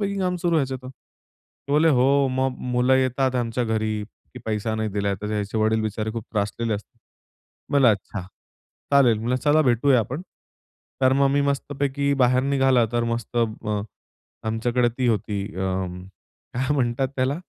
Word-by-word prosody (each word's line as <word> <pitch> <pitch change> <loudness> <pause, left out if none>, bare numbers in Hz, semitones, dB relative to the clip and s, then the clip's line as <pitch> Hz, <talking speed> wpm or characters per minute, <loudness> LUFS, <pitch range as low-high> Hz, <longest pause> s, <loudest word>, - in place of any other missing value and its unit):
पैकी 200 -1 -1
काम 180 -1 0
सुरू 170 -1 +1
ह्याचा 135 -3 0
तर. 130 0 -11
ते 135 +2 -14
बोलले, 155 +2 +4
"हो 135 0 +4
मग 130 0 0 0.2
मुलं 125 +2 +3
येतात 130 0 +1
आमच्या 120 0 -1
घरी, 110 -1 -1 0.3
की - - -7
पैसा 110 0 -2
नाही 110 0 -1
दिला." 100 0 -1
तर 105 - -3
याचे 105 +1 -2
वडील 110 +1 +2
बिचारे 110 0 -2
खूप 115 -2 -5
त्रासलेले 110 +1 -1
असतात. 105 - -9 0.7
मला 135 -5 +6
अच्छा 105 +1 -3 0.7
चालेल 125 -6 +5
म्हणलं 120 +3 0
चला 150 +4 +3
भेटूया 125 +1 +3
आपण. 130 - -4 0.8
तर 130 0 +5
मग 140 0 +3
मी 140 +1 +2
मस्तपैकी 140 0 -1
बाहेर 125 +1 +4
निघाला 135 -3 +3
तर 120 0 +1
मस्त 115 0 -4
अ, 110 -2 -1 0.7
आमच्याकडे 120 +2 +1
ती 125 - +1
होती 105 -2 -1
अं, 95 -1 -3 0.5
काय 130 +3 0
म्हणतात 130 0 0
त्याला 130 +2 +1
125 Hz, 160 wpm, -24 LUFS, 110-135 Hz, 0.8 s, मला